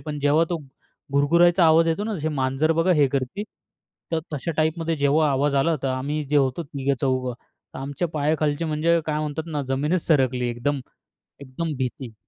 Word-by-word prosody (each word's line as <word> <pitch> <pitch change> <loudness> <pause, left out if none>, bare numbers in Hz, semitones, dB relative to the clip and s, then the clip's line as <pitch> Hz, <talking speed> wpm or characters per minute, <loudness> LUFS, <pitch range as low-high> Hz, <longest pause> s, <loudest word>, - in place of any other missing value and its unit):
पण 150 -2 -5
जेव्हा 145 +3 +3
तो 170 - -1 0.5
घुरुघुरायचा 170 +5 +4
आवाज 165 +1 +5
येतो 165 +6 0
ना, 220 -1 -2
तसे 155 -1 -2
मांजर 135 +2 +1
बघा 165 +3 +2
हे 145 -4 +4
करती 140 +9 -2 0.7
तर 165 - +2
तशा 150 +2 -3
टाइपमध्ये 160 +1 0
जेव्हा 145 +1 +3
आवाज 140 +1 +1
आला, 160 +4 +2
तर 135 - 0
आम्ही 140 +4 -2
जे 150 - +3
होतो 135 +3 +1
तिघे 140 -2 -2
चौघं 130 -2 0 0.5
आमच्या 145 +6 -3
पायाखालचे 155 0 0
म्हणजे 165 +2 +2
काय 150 -1 -1
म्हणतात 155 +1 -3
ना 145 -1 -1
जमीनच 150 +6 0
सरकली. 130 -5 +2
एकदम, 120 +4 -2 0.6
एकदम 140 +4 -4
भीती. 125 -2 -4
150 Hz, 170 wpm, -24 LUFS, 135-165 Hz, 0.7 s, आवाज